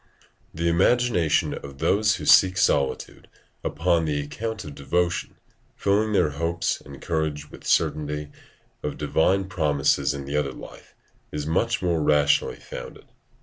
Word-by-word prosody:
The 85 +1 -2
imagination 90 0 +2
of 70 -1 -8
those 100 +7 +2
who - - -7
seek 95 0 +6
solitude 70 -5 0 0.4
upon 85 +2 +1
the 75 -2 -1
account 110 +10 -5
of 75 - -8
devotion, 85 +6 -1 0.4
filling 105 +2 +1
their 75 -6 +3
hopes 85 +3 -1
and 70 -1 -11
courage 75 -3 -3
with - - -11
certainty 75 -1 0 0.5
of - - -4
divine 80 +6 +2
promises 75 -6 +1
in 70 -1 -6
the 70 +1 -4
other 70 -3 0
life, - - -13 0.4
is 75 -1 -4
much 95 +8 0
more 85 -3 +1
rationally 75 -1 +3
founded. - - -10
80 Hz, 140 wpm, -24 LUFS, 75-90 Hz, 0.5 s, seek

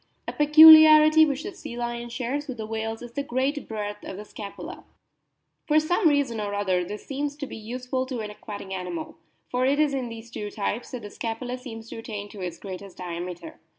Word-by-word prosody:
A - - -3
peculiarity 310 +1 +9
which 285 +1 -2
the 400 - -6
sea 240 -10 -8
lion 240 0 -4
shares 260 +5 -3
with 260 -3 -6
the 220 - -5
whales 225 +1 -4
is 240 - -9
the 280 - -3
great 275 +2 -2
breadth 210 -1 -5
of 190 - -7
the 210 - -8
scapula; 205 -1 -9 0.8
for 305 -1 +5
some 345 +4 +2
reason 275 -7 0
or 205 -1 -3
other 190 -3 +1
this 210 +4 -7
seems 285 +1 -3
to 290 -1 -5
be - - -9
useful 250 +4 -4
to 255 -3 -4
an 210 -1 -5
aquatic 205 -2 -9
animal, 310 - -5 0.3
for 250 0 0
it 275 +2 +3
is 300 -2 +3
in 260 -3 -2
these 230 0 -10
two 210 -2 -5
types 210 +3 -3
that 245 -3 -7
the 205 - -8
scapula 240 +2 -4
seems 230 -3 -9
to - - -6
attain 205 -2 -6
to 205 - -10
its 175 -2 -4
greatest 195 -1 -9
diameter. 175 -1 -6
235 Hz, 210 wpm, -25 LUFS, 210-285 Hz, 0.8 s, peculiarity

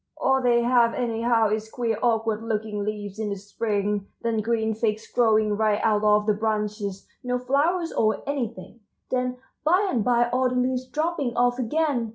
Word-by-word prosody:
All 265 0 +2
they 240 -1 +3
have 235 -1 +3
anyhow 230 -2 +1
is 215 0 -2
queer 230 -2 -2
awkward 225 -2 +1
looking 220 -2 -3
leaves 205 -1 -5
in 215 -1 -2
the 200 - -2
spring, 205 0 -2 0.2
then 230 -2 0
green 220 0 0
figs 220 0 -1
growing 215 -3 +2
right 215 -1 +1
out 215 -1 +2
of 210 0 +4
the 215 - +3
branches, 210 -2 -3 0.2
no 250 0 -1
flowers 300 +7 0
or 220 -1 +1
anything, 235 -7 -4 0.3
then 250 0 -1 0.3
by 360 +7 +3
and 230 -4 0
by 240 0 +3
all 255 +1 +2
the 250 - -3
leaves 255 0 0
dropping 305 -5 -2
off 245 +1 +2
again! 255 -2 0
230 Hz, 175 wpm, -25 LUFS, 215-250 Hz, 0.3 s, of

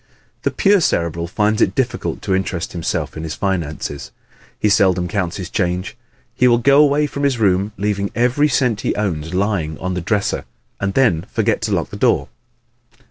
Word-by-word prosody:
The - - +1
pure 200 -1 +3
Cerebral 85 - 0
finds 105 +4 0
it 95 - +2
difficult 130 -2 -2
to 95 - 0
interest 95 -2 -2
himself 85 -2 -3
in 80 - -5
his 80 -1 -5
finances. 80 -7 -3 0.5
He - - +2
seldom 95 -3 +3
counts 90 -1 -2
his 95 -3 -5
change. 90 0 -1 0.4
He 125 +1 +3
will 120 -1 +5
go 140 +4 +5
away 150 0 +3
from 140 -1 -5
his 140 -3 +1
room 100 -1 +2
leaving 100 0 -1
every 125 +6 +3
cent 125 -6 +1
he - - -1
owns 85 -5 -2
lying 95 -6 -1
on 90 0 -3
the 90 - -2
dresser 100 +3 -1 0.3
and 100 -1 -2
then 110 -12 +2
forget - - 0
to - - -2
lock - - -1
the - - -6
door! - - +2
100 Hz, 185 wpm, -19 LUFS, 90-120 Hz, 0.5 s, will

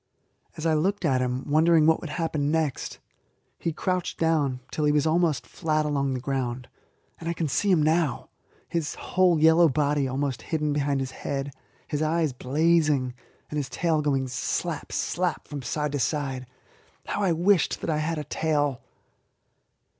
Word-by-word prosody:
As 155 - -5
I 160 - +3
looked 190 +5 0
at 130 -4 +2
him, 125 +1 -2
wondering 160 +1 +4
what 160 0 +4
would 170 - -6
happen 150 -2 -1
next, 155 -3 -1 0.6
he 165 - -1
crouched 180 +2 -2
down 150 -6 +1
till 155 - -1
he 150 - +4
was 150 0 +2
almost 160 -5 +2
flat 155 -1 -1
along 140 -3 0
the - - -2
ground, 130 -2 -3 0.5
and 165 - -4
I - - 0
can 165 -1 -2
see 200 +8 0
him 175 -5 +4
now, 155 -4 +1 0.4
his 165 -3 -2
whole 180 -3 +2
yellow 160 +1 +6
body 145 0 +1
almost 135 0 -2
hidden 150 -2 -1
behind 140 -1 0
his 130 -1 -4
head, 140 +1 -4 0.4
his 150 0 -2
eyes 155 -2 +1
blazing, 150 0 +2 0.4
and 150 - -2
his 140 -3 -2
tail 160 +2 +1
going 135 -3 0
slap, 130 +1 -3
slap! - - -1
from 145 -1 -6
side 150 +4 -2
to 145 - -2
side. 135 -2 -2 0.6
How - - -2
I 190 -3 +2
wished 175 +2 +2
that - - -3
I 155 - +1
had 160 +1 -1
a 150 - -3
tail! 145 -5 0
150 Hz, 170 wpm, -26 LUFS, 140-160 Hz, 0.6 s, yellow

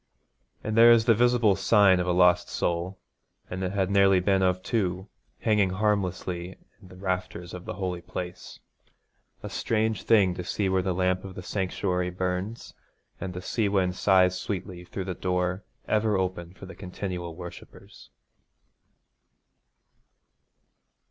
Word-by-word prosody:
And 110 - -2
there 115 +1 +8
is 115 -1 +5
the 115 - +6
visible 120 -3 +3
sign 100 -1 +4
of 90 - -1
a - - +2
lost 90 0 +4
soul, 85 +2 -2 0.5
and 90 +1 -3
it 90 - -1
had 95 -1 0
nearly 100 -1 +5
been 95 +1 +2
of 90 0 +1
two, 95 -4 -1 0.3
hanging 105 -3 +3
harmlessly 95 -3 -2 0.2
in 95 - -15
the 90 - -14
rafters 90 -2 -4
of 90 0 -8
the - - -5
holy 90 -2 -3
place. 90 0 -7 0.8
A - - -4
strange 110 -1 0
thing 100 -5 +4
to 90 - -6
see 95 +2 -1
where 95 0 +2
the 90 -1 -1
lamp 90 0 0
of 95 -1 -9
the 90 - -7
sanctuary 90 -1 -1
burns, 90 +5 -4 0.5
and 90 -2 -5
the 90 - -6
sea 110 -1 0
wind 95 -2 +1
sighs 95 -2 +3
sweetly 90 -3 -5
through 95 +1 -5
the 95 - -3
door 90 +2 -1 0.2
ever 110 -1 +2
open 90 -1 -3
for 95 - -11
the 95 - -10
continual 90 -3 -6
worshippers. 90 0 -12
95 Hz, 150 wpm, -27 LUFS, 90-100 Hz, 0.8 s, there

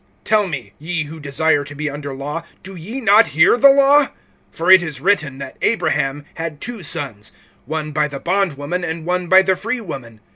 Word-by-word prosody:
(21)Tell 210 -3 +2
me, 140 -7 -6
ye 165 +1 -3
who 155 +2 -10
desire 150 +1 +1
to 145 +1 -11
be 150 +1 -3
under 145 0 -5
law, 145 +4 -5 0.2
do 190 +1 -9
ye 205 +10 -6
not 220 -1 +5
hear 160 +7 +6
the 275 +3 +7
law? 280 +1 +5 0.5
(22)For 180 +3 +4
it 190 - +7
is 155 -6 -5
written, 160 -6 0
that 140 - -9
Abraham 145 -9 0
had 160 -2 -6
two 240 +1 -6
sons, 140 - -3 0.4
one 155 0 -4
by 150 0 +1
the 140 -2 -7
bondwoman, 175 -1 -1
and 160 -1 -4
one 180 0 -1
by 190 0 +7
the 190 0 +2
freewoman. 165 - -6
160 Hz, 190 wpm, -19 LUFS, 145-190 Hz, 0.5 s, the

